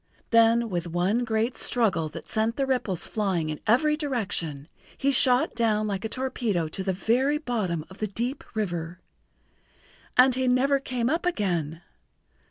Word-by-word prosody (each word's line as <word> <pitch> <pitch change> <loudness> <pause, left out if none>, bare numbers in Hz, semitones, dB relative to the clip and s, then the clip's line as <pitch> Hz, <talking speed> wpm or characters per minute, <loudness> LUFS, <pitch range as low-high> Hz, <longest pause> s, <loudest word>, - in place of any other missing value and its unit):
Then 230 0 +4
with 175 -1 -2
one 180 +8 0
great 225 +2 -1
struggle 195 -10 +2
that - - -9
sent 220 +1 0
the 275 - 0
ripples 235 -10 -1
flying 190 -7 -1
in 155 - -4
every 300 +7 +4
direction, 200 - -3 0.3
he 280 - +1
shot 255 -1 +4
down 220 -2 +1
like 200 -1 -3
a 220 - -3
torpedo 230 -10 -1
to 190 - -5
the 190 - 0
very 250 +10 +1
bottom 210 - -2
of 190 - -14
the 215 - -1
deep 240 +7 -3
river. 175 -4 -3 1.2
And 255 +1 +7
he 260 +1 0
never 270 +3 +3
came 250 -3 -2
up 325 +6 0
again! 175 - -1
220 Hz, 160 wpm, -26 LUFS, 180-255 Hz, 1.2 s, And